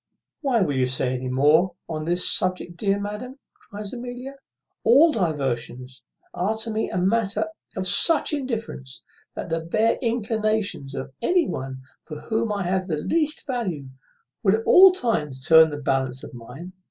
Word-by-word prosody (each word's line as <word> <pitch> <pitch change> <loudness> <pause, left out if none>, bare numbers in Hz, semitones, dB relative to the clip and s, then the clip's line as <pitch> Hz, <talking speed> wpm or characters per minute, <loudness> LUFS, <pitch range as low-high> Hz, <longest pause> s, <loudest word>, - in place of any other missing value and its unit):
"Why 260 -6 +1
will 160 -7 +1
you 130 -1 +1
say 130 0 0
any 130 0 -4
more 155 +7 +3
on 155 -1 -4
this 175 +2 +2
subject, 185 -1 +1
dear 200 +2 0
madam?" 210 +6 -6 0.3
cries 205 +1 -7
Amelia. 250 +2 -7 0.5
"All 280 +9 +6
diversions 130 - -3 0.3
are 210 +5 -1
to 225 +1 -4
me 220 +1 -1
matters 195 +4 +1 0.3
of 185 - -2
such 305 - +3
indifference, 225 - -5 0.3
that - - -6
the 165 0 0
bare 215 +8 +1
inclinations 215 - -1
of 135 0 -6
any 350 +6 +2
one 130 0 -5 0.2
for 155 -2 -9
whom 225 +3 -2
I 200 -2 -2
have 185 +1 -1
the 160 -4 -1
least 305 - -1
value 185 - -3 0.5
would 195 0 +3
at 225 - -4
all 380 +1 +8
times 150 - -2
turn 160 -1 +7
the 145 - -5
balance 135 -2 -1
of - - -10
mine. 155 +10 -10
185 Hz, 160 wpm, -24 LUFS, 145-230 Hz, 0.5 s, all